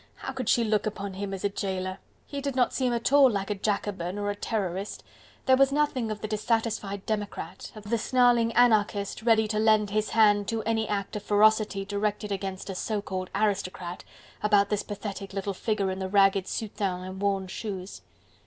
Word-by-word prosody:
How 265 - -6
could 255 -3 -3
she 235 - +4
look 215 -1 +1
upon 200 -2 -4
him 195 +1 -4
as 195 0 -5
a 205 - +2
jailer? 190 -1 -3 0.3
He 280 -1 -5
did 280 -2 -3
not 250 -2 +2
seem 255 -2 +1
at 235 +3 0
all 280 -2 +8
like 200 -2 -2
a - - +3
Jacobin 200 -2 -2
or 205 0 -1
a - - -5
Terrorist, 200 -2 -3 0.4
there 260 - +6
was 275 +1 +4
nothing 275 -5 0
of 215 -1 -4
the 215 - -3
dissatisfied 215 -2 -1
democrat, 210 -2 -4
of 215 - -10
the 235 - +2
snarling 240 -1 +3
anarchist 215 -4 +2
ready 220 -1 +3
to 215 0 -1
lend 215 -2 +3
his 215 +1 0
hand 205 -2 +4
to 225 -1 -1
any 220 0 0
act 200 -1 -3
of - - -6
ferocity 210 -1 +3
directed 205 +1 -2
against 195 -1 -4
a 195 - -4
so 210 +3 -2
called 185 -2 -4
aristocrat, 195 -4 -1 0.4
about 205 -1 +3
this 210 -1 0
pathetic 200 -1 -6
little 195 0 -2
figure 200 -1 -1
in 190 - -4
the 190 0 -3
ragged 195 -1 +4
soutane 200 -4 -3
and 185 +1 -7
worn 195 -1 +1
shoes. 190 0 -6
205 Hz, 195 wpm, -27 LUFS, 195-220 Hz, 0.4 s, all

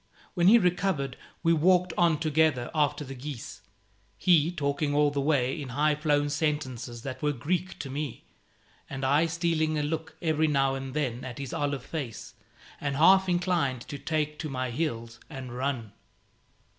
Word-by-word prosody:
When 175 -2 +3
he 225 +4 +9
recovered 180 - 0 0.3
we 165 0 +4
walked 180 +2 +3
on 170 -3 +3
together 155 -5 +1
after 150 -1 +1
the 135 - -7
geese, 130 -7 -7 0.6
he 170 -3 +4
talking 145 -2 -1
all 145 0 +4
the 140 -1 -1
way 135 -2 +1
in 135 - -6
high 150 +4 +2
flown 145 -1 +1
sentences 130 -6 -2
that 130 -1 -6
were 150 - +2
Greek 170 +8 -2
to 140 - -6
me, 145 -2 -5 0.6
and 135 -1 -4
I 145 +5 +3
stealing 165 -2 0
a 150 - 0
look 160 +2 -3
every 160 -2 +1
now 135 -2 +2
and 135 0 -5
then 130 -5 -1
at 125 -2 -7
his 135 -3 -6
olive 140 -3 -1
face, 135 -9 -6 0.5
and 140 -1 -2
half 190 +5 +6
inclined 175 -8 +1
to 140 +3 -7
take 150 -1 -2
to 160 -1 -4
my 130 -2 -2
heels 115 -5 -3
and 130 -5 -7
run. 125 -5 -2
145 Hz, 170 wpm, -28 LUFS, 135-160 Hz, 0.6 s, he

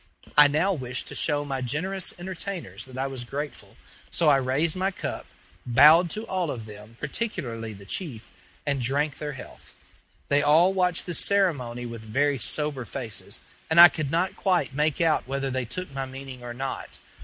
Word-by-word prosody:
I 150 0 +9
now 160 +7 +2
wished 125 -6 -2
to - - -6
show 145 0 +1
my 135 -2 -3
generous 175 +9 -1
entertainers 175 - -6
that 130 -1 -11
I 135 - -1
was 135 -2 -4
grateful; 145 +4 -6 0.3
so 165 -3 +2
I 140 - +6
raised 135 +6 0
my 190 +1 +1
cup, 195 - -5 0.4
bowed 155 +8 +7
to 215 +7 -4
all 185 -6 -1
of 115 -5 -5
them, 105 +2 -12
particularly 120 - -3
the 100 0 -12
chief, 125 - -5 0.3
and 140 -3 0
drank 140 +4 0
their 150 -1 -4
health. 130 - -11 0.5
They 145 0 +3
all 160 +6 +5
watched 180 -2 +1
this 175 -3 0
ceremony 140 -12 +1
with 115 -1 -7
very 135 +5 +1
sober 150 0 -1
faces, 115 -2 -5 0.3
and 160 +1 +4
I 175 0 +12
could 155 -4 -3
not 170 +5 0
quite 180 -8 +1
make 150 +1 +1
out 160 -5 +2
whether 135 0 -2
they 130 -1 -1
took 180 +6 -6
my 135 -1 -4
meaning 130 -1 -9
or 120 -1 -6
not. 135 +2 -5
145 Hz, 180 wpm, -26 LUFS, 125-170 Hz, 0.5 s, I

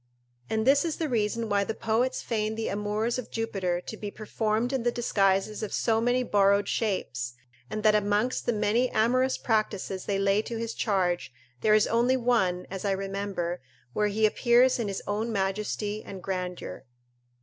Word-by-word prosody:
And 220 0 0
this 275 +2 +5
is 325 -3 -1
the 320 - -1
reason 230 -2 0
why 200 -1 +2
the 220 - -3
poets 230 +4 0
feign 215 -2 -1
the 225 0 -2
amours 210 +4 -1
of 250 - -7
Jupiter 195 -6 -1
to 220 - -7
be 210 -1 -5
performed 220 +3 -1
in 265 - 0
the 240 +1 +1
disguises 200 -3 +1
of 215 - -4
so 225 -1 +1
many 245 +2 +2
borrowed 200 -2 +3
shapes, 125 - -2 0.3
and 215 0 -4
that 215 -1 +5
amongst 210 +4 +1
the - - +4
many 230 +3 +1
amorous 255 +4 +2
practices 210 -4 -1
they 200 - 0
lay 195 +1 +2
to 230 +1 -5
his 230 0 -3
charge, 180 - 0 0.3
there 215 0 +5
is 215 - +4
only 240 +3 +2
one, 220 -8 +1
as 190 -1 -5
I 200 -1 +1
remember, 195 -3 -3 0.3
where 210 - +2
he 215 +1 +2
appears 245 +3 +4
in 225 - -1
his 195 -1 -4
own 215 +3 -2
majesty 205 +1 -2
and 190 -2 -9
grandeur. 180 -5 -4
215 Hz, 180 wpm, -27 LUFS, 195-230 Hz, 0.3 s, this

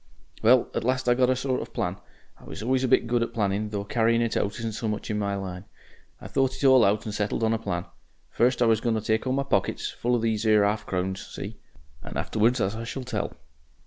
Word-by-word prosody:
"Well, 120 +2 +5
at - - -2
last 130 +1 0
I 120 - +6
got 125 0 +3
a 130 - +3
sort 130 0 -1
of - - -9
plan. - - -1 0.4
I - - -16
was - - -7
always 130 +2 +1
a - - +2
bit 120 - +4
good 120 0 +1
at 115 0 -3
planning, 105 -1 0
though 100 -1 -3
carrying 115 +2 +2
out 115 - -1
isn't 110 +3 -1
so 110 +1 -4
much 105 +1 -3
in 105 - -1
my 100 -1 -1
line. 95 -1 -6 0.5
I - - -9
thought 135 -1 +1
it - - -8
all 130 -2 +7
out 100 +2 +2
and 105 - -4
settled 105 +2 -1
on 110 0 +3
a 115 - -1
plan. 90 -5 -3 0.5
First, 125 +1 +2
I - - +4
was 110 -1 +3
going 115 -2 +1
to 110 - -1
take 110 +3 0
all 130 - +1
my 140 +1 +1
pockets 140 - -1
full 120 +1 0
of 115 - -1
these 110 -1 0
'ere 105 -2 +4
'arf 105 +1 -1
crowns 95 +1 -2
see? - - -7 0.4
and - - -7
afterwards 115 +4 +1
as 100 0 0
I 115 - -5
shall 130 +3 -5
tell. 125 - -4
115 Hz, 250 wpm, -26 LUFS, 105-125 Hz, 0.5 s, all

